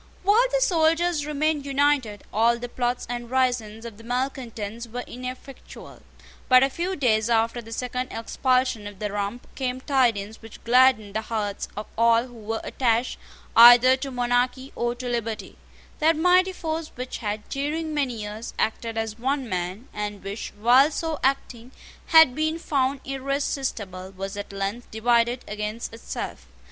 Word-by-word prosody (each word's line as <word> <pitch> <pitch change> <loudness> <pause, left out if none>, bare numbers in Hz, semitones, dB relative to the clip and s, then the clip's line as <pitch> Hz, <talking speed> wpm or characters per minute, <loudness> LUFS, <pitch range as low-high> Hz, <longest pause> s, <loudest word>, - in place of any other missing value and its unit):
While 430 +6 +4
the - - +1
soldiers 330 -5 +2
remained 300 0 0
united, 275 -6 +1
all 230 +3 +3
the 245 +1 -6
plots 245 0 -2
and 240 0 -5
risings 240 -4 0
of 225 -3 -8
the - - -13
malecontents 235 -3 -4
were 245 +2 -5
ineffectual. 255 +2 -9 0.5
But 255 0 +7
a 270 - +2
few 355 +6 -2
days 225 -6 +2
after 230 +1 +1
the 225 0 -13
second 250 +2 -3
expulsion 255 -1 0
of 205 -1 -10
the 210 +1 -3
Rump, 205 +4 -3
came 255 -1 -3
tidings 235 -7 0
which 225 -1 -13
gladdened 240 -4 +4
the 220 - 0
hearts 210 -2 -3
of 210 - -4
all 230 +1 +4
who 250 - -14
were 225 -1 -4
attached 240 -1 0 0.4
either 245 +2 +9
to 275 +1 -5
monarchy 250 +1 0
or 240 0 -1
to 250 0 -6
liberty: 230 -2 -3 0.4
That 315 +1 +3
mighty 365 +3 +4
force 325 -2 -3
which 250 +1 -5
had, 210 -1 -4
during 310 +3 -2
many 260 -7 -1
years, 210 +3 -7
acted 225 +1 -2
as 225 0 -3
one 265 +1 -1
man, 185 +4 -4
and 205 -1 -5
which, 200 +3 -5
while 250 +6 +6
so 320 0 -3
acting, 260 -2 -1 0.3
had 320 -6 +7
been 315 +3 -1
found 275 -4 0
irresistible, 265 -8 -3
was 195 +1 -5
at 205 0 -6
length 200 +4 -4
divided 235 +2 +1
against 210 +3 -4
itself. 225 - -6
245 Hz, 155 wpm, -25 LUFS, 225-275 Hz, 0.5 s, either